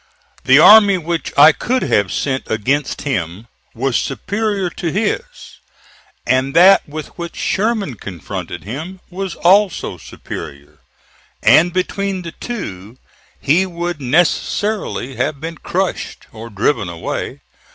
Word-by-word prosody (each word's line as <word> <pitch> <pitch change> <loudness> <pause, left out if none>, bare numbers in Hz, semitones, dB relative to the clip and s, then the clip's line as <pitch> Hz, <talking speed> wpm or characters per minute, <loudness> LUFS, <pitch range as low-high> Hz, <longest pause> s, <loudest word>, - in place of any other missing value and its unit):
The - - +6
army 205 -2 +8
which 170 -1 -3
I 150 +3 +9
could 255 +10 -1
have 100 -2 +1
sent 130 -2 -2
against 130 +7 -1
him 100 - -3 0.3
was 130 +2 -1
superior 200 - -1
to 170 - -4
his, 210 - 0 1.0
and 130 +2 +1
that 185 -1 +6
with 155 +1 -6
which 170 0 -6
Sherman 210 - -1
confronted 90 -3 -7
him 155 - -7
was 190 0 -4
also 195 +2 +2
superior; 70 0 -9 0.6
and 175 +2 +5
between 190 +1 -2
the 165 - -6
two 115 - -7 0.4
he 170 +7 +2
would 175 -3 -4
necessarily 160 - 0
have 140 +3 -1
been 165 +1 -7
crushed, 190 +1 -3
or 115 +1 -9
driven 110 -1 0
away. 85 -1 -5
160 Hz, 120 wpm, -17 LUFS, 125-190 Hz, 1.0 s, I